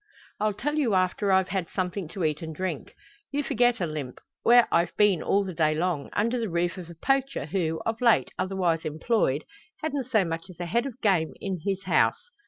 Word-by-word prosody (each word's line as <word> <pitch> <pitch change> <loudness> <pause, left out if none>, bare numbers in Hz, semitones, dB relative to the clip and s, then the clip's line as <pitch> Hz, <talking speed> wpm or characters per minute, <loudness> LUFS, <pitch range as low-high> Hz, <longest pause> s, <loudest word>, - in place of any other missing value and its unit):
"I'll 210 -1 0
tell 295 +8 -2
you 235 -9 +2
after 185 +2 +1
I've 190 0 +3
had 190 -4 -2
something 185 -1 -3
to 180 +3 -5
eat 155 +1 0
and 160 -1 -6
drink. 180 -5 -4 0.4
You 290 +1 -1
forget, 245 -2 +2
Olympe, 155 -7 -4 0.2
where 240 0 +6
I've 170 0 +1
been 205 -5 +4
all 200 +1 +2
the 190 -2 -5
day 155 -1 +2
long 165 -3 -1
under 230 +4 +1
the 225 -3 -2
roof 170 0 0
of 175 -2 -9
a 170 - -10
poacher, 270 - 0
who, 160 -1 -1
of 225 +1 -2
late 235 -3 +4
otherwise 180 -4 0
employed, 155 - 0 0.4
hadn't 285 -5 -2
so 215 -6 +3
much 165 +3 -4
as 180 - -13
a 175 - -3
head 235 +10 0
of 255 -2 -9
game 185 -7 +2
in 190 -3 -3
his 195 -1 -2
house. 485 - +1
190 Hz, 205 wpm, -27 LUFS, 165-225 Hz, 0.4 s, where